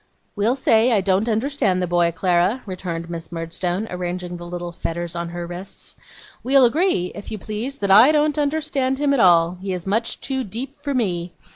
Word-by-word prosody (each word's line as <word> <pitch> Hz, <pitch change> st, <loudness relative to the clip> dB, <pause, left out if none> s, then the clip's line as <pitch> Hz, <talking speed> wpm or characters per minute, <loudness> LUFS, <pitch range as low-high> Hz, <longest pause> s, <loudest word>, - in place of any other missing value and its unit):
'We'll 220 Hz, +4 st, +1 dB
say 235 Hz, -2 st, +3 dB
I 220 Hz, -, +4 dB
don't 195 Hz, +4 st, +1 dB
understand 220 Hz, -4 st, 0 dB
the 180 Hz, -, 0 dB
boy, 175 Hz, -1 st, +2 dB
Clara,' 180 Hz, +7 st, +1 dB
returned 175 Hz, -3 st, -5 dB
Miss 170 Hz, 0 st, -7 dB
Murdstone, 175 Hz, +4 st, -3 dB
arranging 180 Hz, 0 st, -4 dB
the 175 Hz, 0 st, -9 dB
little 175 Hz, 0 st, -5 dB
fetters 170 Hz, 0 st, -4 dB
on 170 Hz, 0 st, -3 dB
her 175 Hz, 0 st, -5 dB
wrists. 175 Hz, +3 st, -8 dB, 0.5 s
'We'll 265 Hz, 0 st, +5 dB
agree, 280 Hz, -, +1 dB
if 205 Hz, -, -9 dB
you 215 Hz, -, -3 dB
please, 220 Hz, +7 st, -5 dB
that 200 Hz, -1 st, 0 dB
I 225 Hz, +9 st, +8 dB
don't 300 Hz, 0 st, +2 dB
understand 290 Hz, -3 st, 0 dB
him 285 Hz, 0 st, +1 dB
at 275 Hz, -, +1 dB
all. 175 Hz, -2 st, +4 dB
He 190 Hz, -1 st, -3 dB
is 180 Hz, -2 st, -5 dB
much 225 Hz, +4 st, -1 dB
too 265 Hz, -1 st, -2 dB
deep 250 Hz, +8 st, -6 dB
for 285 Hz, -1 st, -3 dB
me. 175 Hz, -7 st, -1 dB
195 Hz, 190 wpm, -21 LUFS, 175-255 Hz, 0.5 s, I